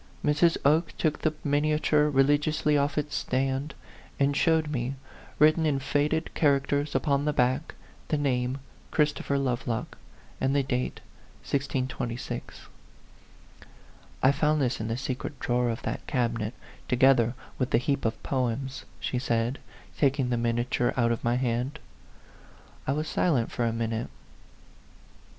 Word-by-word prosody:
Mrs. 150 +3 +3
Oke 155 +3 +3
took 155 -2 0
the 155 - +2
miniature 150 +1 +2
re 135 -2 +4
ligiously 150 +1 +2
off 145 +1 +1
its 150 -1 -1
stand, 135 +2 -1 0.4
and 140 0 +2
showed 160 0 +2
me, 130 -1 -2 0.4
written 155 +2 +5
in 150 -3 +2
faded 145 +4 0
characters 145 0 +1
upon 140 -2 +2
the 150 0 +1
back, 130 +3 +1 0.3
the 155 - +1
name 130 -2 0 0.3
"Christopher 150 -2 +1
Lovelock," 120 -3 -2 0.4
and 135 +1 +2
the 140 - +3
date 125 -1 -2 0.4
1626. 130 -3 -3 0.9
" - - -24
I 130 - +7
found 150 +1 +2
this 130 -3 0
in 110 - -3
the 115 +1 -2
secret 130 +2 -4
drawer 120 0 +1
of 115 - -4
that - - -4
cabinet, 115 -3 -1 0.3
together 125 -1 +4 0.2
with 130 -1 0
the - - +4
heap 135 +3 0
of 115 - -2
poems," 130 0 -2
she 125 - -2
said, 120 +1 0 0.4
taking 135 -3 +2
the - - +2
miniature 120 +1 0
out 120 -1 +3
of 115 - -2
my 120 +1 +2
hand. 125 +3 -1 1.1
I 135 - +2
was 155 +2 -2
silent 140 -8 +1
for 120 - -1
a 115 - +1
minute. 115 0 -2
135 Hz, 140 wpm, -27 LUFS, 125-145 Hz, 1.1 s, I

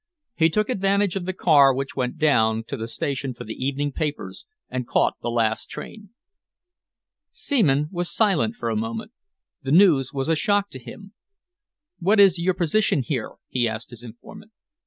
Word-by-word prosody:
He 160 -5 +3
took 210 +5 0
advantage 200 -4 +1
of 190 -2 -3
the - - 0
car 145 -6 +5
which 135 +2 -4
went 125 0 -2
down 115 -8 +2
to - - -3
the 115 -3 -5
station 135 +2 -4
for - - -8
the 110 - -6
evening 140 +3 -2
papers 145 - -5 0.2
and 125 -2 -4
caught - - +2
the - - -3
last 115 -1 -1
train." 210 -3 -9 1.2
Seaman 150 - +1
was 175 -2 -3
silent 215 0 +1
for - - -4
a - - -1
moment. 225 0 -4 0.5
The 135 - -6
news 155 -7 +5
was 135 0 -3
a 165 - +2
shock 200 +5 0
to 130 - -8
him. 200 - -12 0.9
"What 200 +4 +2
is 190 -3 +6
your 180 +1 +1
position 175 -4 +1
here?" 120 -2 -3
he 120 -2 0
asked 110 +1 -5
his 120 -1 -11
informant. 120 - -13
150 Hz, 175 wpm, -23 LUFS, 130-195 Hz, 1.2 s, is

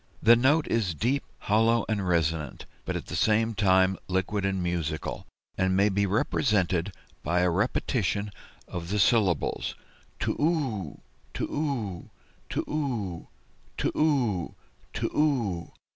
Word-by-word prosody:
The 115 +2 +8
note 145 +6 +3
is 100 -8 0
deep, 130 - 0 0.2
hollow, 115 +2 +3
and 100 -4 -1
resonant, 80 -5 0 0.2
but - - -2
at - - -4
the - - -5
same 110 +1 +2
time 95 -2 +3
liquid 95 +2 -1
and 95 -2 -1
musical, 85 -3 -3 0.3
and 95 0 +2
may 100 +2 +4
be 100 0 +1
represented 95 -3 +1 0.3
by 85 +4 +1
a 90 -1 +3
repetition 105 +1 0 0.4
of 85 -1 -6
the 105 - 0
syllables 100 -3 +2 0.4
too - - -1
u, 130 - -1 0.3
too - - -2
u, 120 - -3 0.4
too - - -1
u, 120 - -3 0.5
too - - 0
u, 125 - +1 0.4
too - - -2
u." 115 - 0
100 Hz, 130 wpm, -27 LUFS, 90-115 Hz, 0.5 s, The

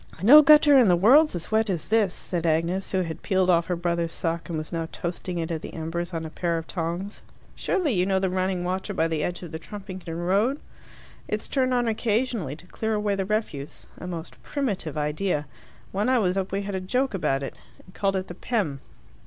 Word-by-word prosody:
"No 290 +9 +10
gutter 300 -1 +7
in 240 - +5
the 180 - +5
world's 255 - +5
as 170 +3 -4
wet 220 0 +2
as 175 -5 -2
this," 215 -3 +3
said 175 -2 -3
Agnes, 170 +4 0
who 190 - +1
had 165 -3 -5
peeled 185 -2 +2
off 170 -1 +2
her 180 - 0
brother's 170 -1 -1
sock, 165 +1 -2
and 165 - -2
was 155 0 -5
now 165 -1 -2
toasting 175 +1 -4
it 165 0 -2
at 160 -2 -3
the - - -8
embers 165 +2 -3
on 165 -2 -4
a 160 - -7
pair 170 0 -1
of 165 - -5
tongs. 175 +4 -4 0.3
"Surely 360 -8 0
you 180 -3 +2
know 190 0 +1
the 190 0 +1
running 185 0 -1
water 190 +3 -3
by 165 -1 +2
the 160 -2 -1
edge 175 +1 -3
of 170 - -8
the 160 - -5
Trumpington 185 -3 -7
road? 200 - +1 0.7
It's - - -3
turned 255 -2 +1
on 240 -1 +1
occasionally 220 - 0
to 165 - -15
clear 220 +4 -2
away 210 -1 0
the 195 -1 -1
refuse 195 -9 -3
a 180 - -7
most 170 -2 -7
primitive 200 - -3
idea. 150 +1 -1 0.5
When 205 +5 0
I 260 - +4
was 185 -5 +1
up 195 -1 -2
we 200 +1 -1
had 200 0 -4
a 190 - -2
joke 250 +7 0
about 140 -7 0
it, 135 - -5 0.3
and 185 - -17
called 195 -1 0
it 185 0 -2
the - - -7
'Pem. 180 - -2
185 Hz, 225 wpm, -25 LUFS, 165-210 Hz, 0.7 s, No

